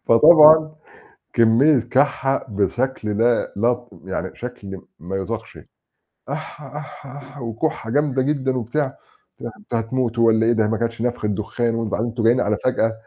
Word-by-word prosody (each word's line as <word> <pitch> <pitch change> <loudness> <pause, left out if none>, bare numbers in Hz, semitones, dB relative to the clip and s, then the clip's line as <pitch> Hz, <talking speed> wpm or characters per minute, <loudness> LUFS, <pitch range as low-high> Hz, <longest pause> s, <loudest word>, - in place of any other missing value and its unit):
فطبعًا 155 +5 +7 0.6
كمّية 120 +5 +4
كَحّة 135 +2 0
بشكل 105 +1 -2
لا 120 +1 +1
لطم 120 -3 -2
يعني 95 0 -3
بشكل 100 -6 -9 0.2
ما 90 +4 -6
يُطاقش 95 -2 -5 0.7
أح، 150 - -6
أح، 145 +1 -10
أح 140 0 -11
وكُحّة 115 0 -3
جامدة 140 -1 +1
جدًا 135 -2 -1
وبتاع 130 +4 -2 0.4
ت - - -15
أنتم 205 - -6
هتموتوا 115 0 0
والّا 110 0 +3
إيه 120 - +4
ده 110 -2 +1
ما 110 - -1
كانتش 115 0 -3
نَفخة 120 -3 -2
دُخّان 115 +3 -2
وبعدين 115 0 -2
أنتم 115 0 -4
جايين 120 +2 +4
على 105 +1 0
فجأة، 120 -3 +1
120 Hz, 145 wpm, -21 LUFS, 110-135 Hz, 0.7 s, فطبعًا